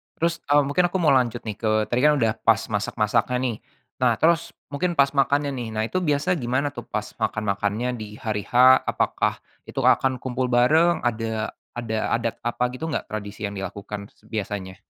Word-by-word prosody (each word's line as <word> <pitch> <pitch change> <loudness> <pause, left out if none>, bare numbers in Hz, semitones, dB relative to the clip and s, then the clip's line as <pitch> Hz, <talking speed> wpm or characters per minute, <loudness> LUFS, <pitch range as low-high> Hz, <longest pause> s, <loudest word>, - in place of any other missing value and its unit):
terus, 170 +1 +1
eee, 145 +1 +4
mungkin 145 +6 +2
aku 185 - -2
mau 160 - +4
lanjut 120 -3 +2
nih 105 -2 -6
ke 110 - -1 0.2
tadi 120 - +1
kan 150 - +6
udah 110 -3 +2
pas 115 -1 +5
masak-masaknya 105 +3 0
nih, 125 -4 -1 0.4
nah 125 -2 +3
terus 165 +1 +2 0.2
mungkin 175 +5 -1
pas 140 -3 +4
makannya 140 +1 +2
nih 120 -2 -4
nah 110 0 0
itu 185 - -2
biasa 145 +5 +1
gimana 130 +2 0
tuh 145 - -8
pas 105 0 -3 0.2
makan-makannya 105 +2 -1
di 110 - -5 0.2
hari 105 -2 -2
H - - -20 0.3
apakah, - - +1 0.3
itu - - -4
akan 130 -2 +3
kumpul 130 0 -2
bareng 155 +8 +4
ada 110 -2 -1 0.2
ada 115 -2 -3 0.2
adat 115 -1 -2
apa 120 +1 -1
gitu 130 +5 -5
enggak 155 - -2
tradisi 105 -1 -6
yang 100 - -9
dilakukan 100 +1 -6 0.2
biasanya? 100 -3 -4
120 Hz, 180 wpm, -24 LUFS, 110-140 Hz, 0.4 s, kan